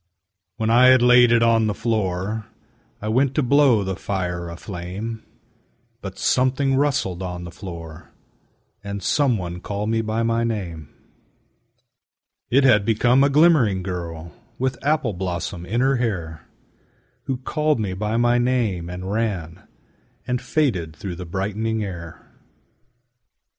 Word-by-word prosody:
When 110 0 0
I 125 +2 +6
had 130 -1 +6
laid 125 -1 +6
it 115 -1 +4
on 115 -1 +3
the 105 - -1
floor 105 -1 -2 0.6
I - - -3
went 130 +4 +1
to 150 - +2
blow 130 -4 +4
the 95 0 -3
fire 90 -3 -3
aflame, 95 +6 -6 0.8
But 95 -1 -7
something 130 +4 +1
rustled 135 -11 0
on 90 -1 -5
the 85 - -8
floor, 85 -4 -9 0.7
And 100 0 -5
some 140 -6 +2
one 90 -1 -6
called 105 +3 -3
me 115 0 +1
by 110 +1 -1
my 115 0 +1
name: 90 -10 -4 1.6
It 135 +3 +4
had 120 -6 +5
become 120 +5 +3
a 140 - +4
glimmering 140 - +4
girl 85 -3 -6 0.3
With 130 0 -2
apple 145 -6 +1
blossom 90 -1 -4
in 115 +6 0
her 135 0 +2
hair 85 - -3 0.8
Who 135 -2 -2
called 150 +2 0
me 100 -4 -2
by 105 +4 -2
my 120 0 +3
name 115 -9 0
and 90 +2 -5
ran 100 -7 -3 0.6
And 125 0 -2
faded 115 - -1
through 90 +2 -6
the 90 -1 -7
brightening 105 +5 -2
air. 85 -4 -8
110 Hz, 140 wpm, -22 LUFS, 90-125 Hz, 1.6 s, I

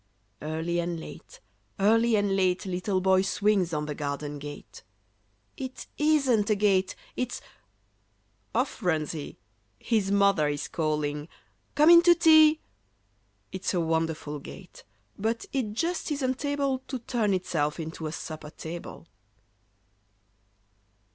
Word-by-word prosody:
Early 160 +3 -2
and 170 -1 -2
late, - - -11 0.4
early 225 +3 +4
and 205 -2 +1
late, 185 -1 +1
Little 185 +1 -1
Boy 190 0 +4
swings 195 -2 +1
on 150 -2 -2
the 150 - -4
garden 145 0 -4
gate. 145 0 -9 0.8
"It 260 -2 -6
isn't 275 -9 +3
a 215 - +4
gate; 195 -2 +2 0.2
it's—" 250 -1 -3 1.2
off 250 +4 -1
runs 160 -4 0
he, 155 -3 -7 0.4
His 210 - 0
mother 200 -6 +3
is 145 -1 -2
calling, 150 -2 -2 0.5
"Come 305 +3 +7
in 340 0 +9
to 345 0 +6
tea!" 315 -2 +6 0.9
It's 190 0 -2
a - - +2
wonderful 160 -2 -1
gate, 180 +5 -12 0.4
but 225 +3 -1
it 240 -7 -1
just 335 +6 -2
isn't 265 -1 -1
able 280 -2 0
To 265 - -3
turn 225 -4 0
itself 155 -4 -1
into 160 0 -5
a - - -4
supper 155 -1 -7
table. 165 +2 -8
190 Hz, 130 wpm, -27 LUFS, 160-245 Hz, 1.2 s, in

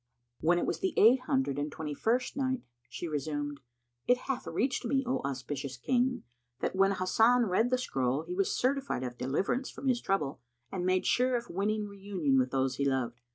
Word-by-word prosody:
When 170 +2 +3
it - - 0
was - - -2
the 375 -2 -1
Eight 240 +5 +7
Hundred 265 - +1
and 145 +1 -2
Twenty 150 -1 -5
first 240 - 0
Night, 260 -2 -1 0.3
She 175 - -5
resumed, 145 -1 -3 0.5
It 245 - +5
hath 270 -2 -3
reached 255 +3 0
me, 270 +3 +1
O 255 +2 0
auspicious 135 0 -4
King, 250 - +1 0.4
that - - -2
when 195 +1 +4
Hasan 225 +6 +3
read 220 +5 +2
the 255 - +2
scroll 135 - -1
he 175 +2 -5
was 195 +1 +1
certified 270 - 0
of 125 -1 -4
deliverance 195 - 0
from 275 - -6
his 245 -2 +2
trouble 150 -10 -1 0.3
and 180 -1 -2
made 185 0 +2
sure 250 +1 +3
of 240 0 -3
winning 210 +3 0
reunion 195 -9 0
with 130 0 +1
those 130 -1 0
he 140 - 0
loved. 120 -3 -2
195 Hz, 195 wpm, -31 LUFS, -, 0.5 s, Eight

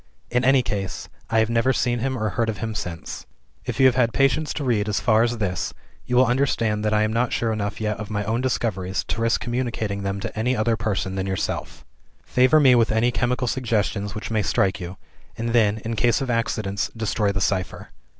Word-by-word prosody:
In 125 +1 +2
any 135 0 +4
case, 95 -6 -4 0.2
I 115 - +1
have 110 0 +3
never 115 +3 +3
seen 120 -1 0
him 130 +2 -1
or 110 -2 -1
heard 115 +1 -1
of 105 - -3
him 110 +1 -3
since. 85 -6 -6 0.4
"If 125 +1 -4
you 135 - +6
have 130 - +6
had 120 -2 +2
patience 135 +3 +2
to 150 - -3
read 110 -5 +1
as 105 - 0
far 110 -2 +3
as 120 0 +1
this, 95 -4 -2 0.3
you 125 - 0
will 130 +1 +6
understand 115 -4 +1
that 105 - +1
I 105 0 +3
am 110 0 0
not 120 +1 +1
sure 115 -1 0
enough 105 -1 -3
yet 105 -1 -1
of 105 -1 -6
my 105 -1 -2
own 115 +4 -1
discoveries 95 -7 -1
to 115 - -2
risk 115 0 +1
communicating 120 -5 -2
them 100 0 -2
to 115 - -5
any 120 +4 0
other 115 +1 +2
person 100 -3 -2
than 95 0 -2
yourself. 95 -1 -3 0.4
Favor 130 +5 +4
me 135 -4 +6
with 115 -2 +3
any 115 +3 +2
chemical 125 +2 0
suggestions 105 -4 -1
which 105 - -5
may 110 -1 +2
strike 95 0 +1
you 90 +1 -7 0.4
and 115 +1 -2
then, 110 -3 +3
in 115 0 -2
case 120 +1 +2
of 135 -3 -2
accidents, 100 -5 -1
destroy 110 -2 0
the 100 - -2
cipher. 95 -2 -2
110 Hz, 220 wpm, -23 LUFS, 105-120 Hz, 0.4 s, you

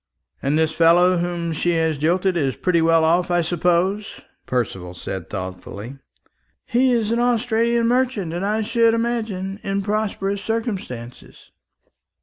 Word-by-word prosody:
"And 140 +3 +1
this 160 0 +2
fellow 175 +3 +5
whom 170 -1 -2
she 175 +3 0
has 160 -3 0
jilted 180 +4 +1
is 140 -6 0
pretty 170 -2 +1
well 165 0 +4
off, 175 +2 +2
I 175 0 +2
suppose?" 180 +4 0 0.3
Percival 95 -8 -3
said 95 0 -6
thoughtfully. 100 +6 -7 0.7
"He 255 +1 +2
is 225 -3 +1
an 235 - +1
Australian 235 -1 +1
merchant, 245 -8 0
and, 175 +2 -3
I 215 +2 0
should 230 +1 +3
imagine, 215 -5 -2
in 195 0 -2
prosperous 200 -1 -2
circumstances." 195 - -5
180 Hz, 135 wpm, -21 LUFS, 160-220 Hz, 0.7 s, fellow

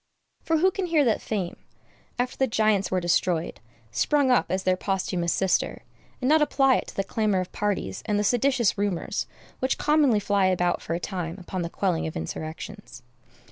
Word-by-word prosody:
For 325 - +1
who 375 +4 +4
can 380 -1 -3
hear 315 -4 +3
that 225 - +1
Fame, 195 -5 -3 0.6
after 245 +1 -1
the 265 - +1
giants 215 -4 +2
were 185 - +1
destroyed, 175 -1 0 0.3
sprung 265 - +2
up 250 - +3
as 190 0 -1
their 185 0 +3
posthumous 185 -2 -1
sister, 190 -1 0 0.4
and 255 - -1
not 310 +2 +5
apply 270 -3 +4
it - - -4
to - - -10
the 195 - 0
clamor 210 -1 0
of 185 - -4
parties 200 - -2
and 210 - +1
the 205 - +1
seditious 245 -1 +2
rumors 200 -4 -1 0.3
which 260 +1 0
commonly 290 -7 +3
fly 200 -1 +2
about 180 -1 +1
for 165 - -3
a - - -2
time 175 -3 -4
upon 185 0 -5
the 170 - -3
quelling 175 -3 -1
of 160 - -5
insurrections? 155 - -7
200 Hz, 185 wpm, -26 LUFS, 180-250 Hz, 0.6 s, not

